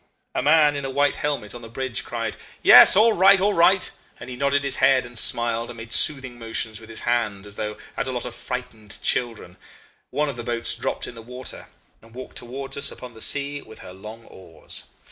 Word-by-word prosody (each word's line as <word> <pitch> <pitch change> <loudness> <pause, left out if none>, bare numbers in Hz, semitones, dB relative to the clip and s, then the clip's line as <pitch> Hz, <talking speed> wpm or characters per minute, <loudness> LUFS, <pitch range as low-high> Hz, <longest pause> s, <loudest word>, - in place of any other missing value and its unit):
A - - -1
man 150 +1 +4
in 140 - -4
a 135 - -3
white 140 +1 +1
helmet, 140 -8 -3
on 120 - -9
the 115 - -11
bridge, 130 +1 -4
cried, - - -4 0.3
'Yes! - - +10
All 220 +3 +5
right! 195 +1 +6
all 205 +2 +2
right!' 185 +2 +3 0.3
and 130 - -9
he - - -6
nodded 140 +2 0
his 140 - -1
head, 130 -1 +3
and 120 0 -13
smiled, 115 0 +1
and 120 - -9
made 115 0 -5
soothing 135 -5 +2
motions 115 -1 -4
with 110 0 -15
his 115 - -7
hand 110 -5 -1
as 100 -1 -8
though 105 0 -5 0.2
at - - -3
a - - -2
lot 125 -1 -4
of 125 - -6
frightened 120 -4 -6
children. 115 -8 -2 0.5
One 150 +1 -1
of 140 - -5
the 120 - -6
boats 120 0 -1
dropped - - -4
in - - -8
the 115 - -11
water, 125 +2 -8 0.3
and 115 +1 -19
walked 130 - -9
towards 135 +3 -6
us 140 - +2
upon 125 -2 -10
the 110 - -14
sea 145 +2 0
with 110 - -15
her 90 - -10
long 110 +4 -11
oars. 85 -4 -9
125 Hz, 220 wpm, -23 LUFS, 115-140 Hz, 0.5 s, Yes